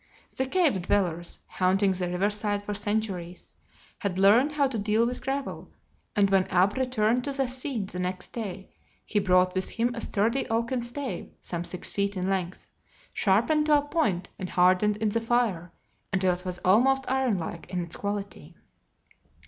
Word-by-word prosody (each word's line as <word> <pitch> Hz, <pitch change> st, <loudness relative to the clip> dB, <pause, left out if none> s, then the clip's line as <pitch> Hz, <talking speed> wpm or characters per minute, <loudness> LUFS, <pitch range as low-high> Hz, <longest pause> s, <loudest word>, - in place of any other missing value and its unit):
The 265 Hz, -, -1 dB
cave 290 Hz, -, +2 dB
dwellers, 175 Hz, -2 st, -1 dB
haunting 190 Hz, +2 st, +2 dB
the 180 Hz, -1 st, -2 dB
river 185 Hz, +4 st, +1 dB
side 205 Hz, -1 st, -2 dB
for 205 Hz, -, -4 dB
centuries, 205 Hz, -4 st, -3 dB, 0.4 s
had 200 Hz, -4 st, -2 dB
learned 225 Hz, +10 st, +5 dB
how 285 Hz, -2 st, +2 dB
to 245 Hz, -4 st, -3 dB
deal 215 Hz, +3 st, +2 dB
with 245 Hz, +1 st, -3 dB
gravel, 275 Hz, +1 st, -4 dB, 0.5 s
and 205 Hz, -1 st, +4 dB
when 190 Hz, -1 st, +3 dB
Ab 190 Hz, +3 st, +3 dB
returned 250 Hz, -2 st, +1 dB
to 285 Hz, -, -1 dB
the 270 Hz, -1 st, 0 dB
scene 255 Hz, -4 st, -3 dB
the 180 Hz, -1 st, -6 dB
next 180 Hz, 0 st, -3 dB
day 200 Hz, -5 st, -6 dB, 0.3 s
he 210 Hz, -, 0 dB
brought 185 Hz, -1 st, +3 dB
with 185 Hz, 0 st, -1 dB
him 235 Hz, +1 st, 0 dB
a 230 Hz, -, -5 dB
sturdy 230 Hz, +6 st, 0 dB
oaken 235 Hz, +2 st, 0 dB
stave 240 Hz, -4 st, -5 dB
some 170 Hz, -1 st, -5 dB
six 180 Hz, +1 st, -3 dB
feet 200 Hz, 0 st, -1 dB
in 185 Hz, 0 st, -1 dB
length, 185 Hz, -2 st, -3 dB, 0.4 s
sharpened 235 Hz, +11 st, +2 dB
to 300 Hz, -1 st, +6 dB
a -, -, +2 dB
point 290 Hz, -, -1 dB
and 185 Hz, -, -4 dB
hardened 185 Hz, +4 st, +3 dB
in 215 Hz, 0 st, 0 dB
the 230 Hz, +2 st, 0 dB
fire 225 Hz, -8 st, 0 dB, 0.4 s
until 185 Hz, -1 st, +2 dB
it 180 Hz, +1 st, -7 dB
was 180 Hz, -1 st, -3 dB
almost 265 Hz, +8 st, +4 dB
iron 260 Hz, -5 st, +1 dB
like 165 Hz, 0 st, -6 dB
in 180 Hz, -1 st, -1 dB
its 170 Hz, -, -8 dB
quality. 200 Hz, -5 st, -5 dB
205 Hz, 175 wpm, -27 LUFS, 185-245 Hz, 0.5 s, to